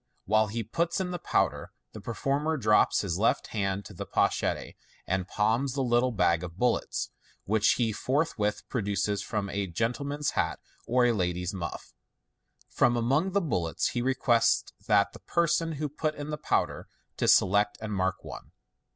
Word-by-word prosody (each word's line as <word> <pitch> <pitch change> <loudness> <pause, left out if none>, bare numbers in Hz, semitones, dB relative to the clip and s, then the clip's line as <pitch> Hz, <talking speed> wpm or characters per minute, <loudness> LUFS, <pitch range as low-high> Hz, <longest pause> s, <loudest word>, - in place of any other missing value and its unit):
While 110 +1 +3
he 115 +3 -3
puts 170 - -1
in 185 -1 -2
the 175 - -4
powder, - - 0 0.2
the 110 - -9
performer 140 +8 -1
drops 105 -5 +3
his 95 -3 -2
left 115 - +1
hand 100 -2 -1
to - - -10
the - - -7
pochette, - - 0 0.3
and 95 0 -1
palms 115 +5 +1
the 135 -1 -1
little 120 +1 +2
bag 90 -5 +2
of 85 -1 -8
bullets, 125 +2 0 0.3
which 110 +1 +3
he 115 -3 0
forthwith 125 -5 -1
produces 100 -2 -1
from 100 0 -3
a 100 -1 -2
gentle 115 +9 -1
man's 145 +1 -1
hat, - - -1 0.3
or 125 0 +3
a 120 - +4
lady's 90 -3 -1
muff.* 90 -3 -6 0.7
From 120 - +2
among 140 +11 +1
the 200 - +3
bullets 85 - -1
he 120 - -2
re 130 +2 +1
quests 120 -3 +2
the 100 0 +2
person 170 -1 +1
who 150 0 -2
put 155 +2 -2
in 145 +1 -6
the 150 - -2
powder - - -1 0.3
to - - 0
select 105 +2 +4
and 110 -1 -5
mark 95 -1 -1
one. - - -10
115 Hz, 170 wpm, -28 LUFS, 100-140 Hz, 0.7 s, a